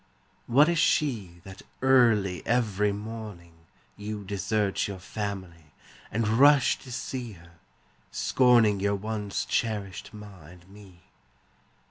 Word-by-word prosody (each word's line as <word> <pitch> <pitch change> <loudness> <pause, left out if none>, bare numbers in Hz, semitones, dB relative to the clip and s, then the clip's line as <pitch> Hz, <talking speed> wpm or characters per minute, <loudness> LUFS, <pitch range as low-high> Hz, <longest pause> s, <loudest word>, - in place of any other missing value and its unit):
What 140 +6 +5
is 170 -1 +1
she 110 - 0
That 95 -1 -11 0.2
early 115 -8 +3
every 105 -4 +1
morning 105 -5 -8 0.4
You 105 0 -6
desert 100 +1 -1
your 100 -2 -6
family 95 -5 -7 0.4
And 110 +1 -1
rush 135 +5 +4
to 130 - -12
see 120 -1 -5
her, 85 -1 -18 0.5
scorning 120 -6 +3
Your 100 +1 0
once 105 0 -4
cherished 105 -5 -3
ma 105 -6 -12
and 90 +1 -16
me? 95 -3 -16
105 Hz, 115 wpm, -27 LUFS, 95-115 Hz, 0.5 s, What